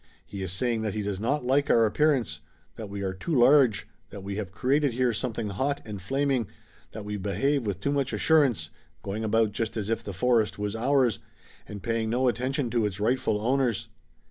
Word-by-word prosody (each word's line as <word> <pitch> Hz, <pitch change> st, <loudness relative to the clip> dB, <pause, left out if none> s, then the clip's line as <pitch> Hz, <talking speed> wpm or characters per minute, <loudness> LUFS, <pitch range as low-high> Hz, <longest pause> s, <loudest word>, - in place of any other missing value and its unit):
He 100 Hz, -, -7 dB
is 95 Hz, -2 st, -3 dB
saying 115 Hz, +4 st, -1 dB
that 110 Hz, -2 st, -2 dB
he 105 Hz, -, -2 dB
does 100 Hz, -2 st, -3 dB
not 125 Hz, +5 st, -1 dB
like 140 Hz, +3 st, +2 dB
our 115 Hz, -1 st, +5 dB
appearance, 120 Hz, -, +1 dB, 0.4 s
that 110 Hz, -3 st, -7 dB
we 100 Hz, 0 st, -5 dB
are 95 Hz, -1 st, -2 dB
too 150 Hz, -, -3 dB
large, 125 Hz, -, +5 dB, 0.2 s
that 100 Hz, -1 st, -9 dB
we 100 Hz, 0 st, -4 dB
have 100 Hz, -4 st, -4 dB
created 135 Hz, +5 st, +1 dB
here 125 Hz, 0 st, +1 dB
something 110 Hz, -2 st, -3 dB
hot 135 Hz, +9 st, -1 dB
and 105 Hz, -3 st, -7 dB
flaming, 135 Hz, +1 st, 0 dB, 0.4 s
that 110 Hz, -1 st, -8 dB
we 105 Hz, 0 st, -3 dB
behave 105 Hz, +7 st, 0 dB
with 100 Hz, -3 st, -2 dB
too 140 Hz, -, -1 dB
much 140 Hz, -2 st, 0 dB
assurance, 130 Hz, -, +2 dB, 0.3 s
going 105 Hz, +3 st, -4 dB
about 110 Hz, 0 st, +2 dB
just 115 Hz, +2 st, -3 dB
as 105 Hz, -1 st, -3 dB
if 115 Hz, -, -1 dB
the 100 Hz, -, -5 dB
forest 115 Hz, +3 st, +1 dB
was 105 Hz, +1 st, -3 dB
ours, 125 Hz, 0 st, +2 dB, 0.5 s
and 100 Hz, -2 st, -8 dB
paying 115 Hz, -1 st, -1 dB
no 125 Hz, +3 st, +1 dB
attention 130 Hz, +1 st, -1 dB
to 120 Hz, -2 st, +1 dB
its 100 Hz, -1 st, -6 dB
rightful 110 Hz, -1 st, +1 dB
owners." 125 Hz, -4 st, +1 dB
115 Hz, 200 wpm, -27 LUFS, 100-130 Hz, 0.5 s, our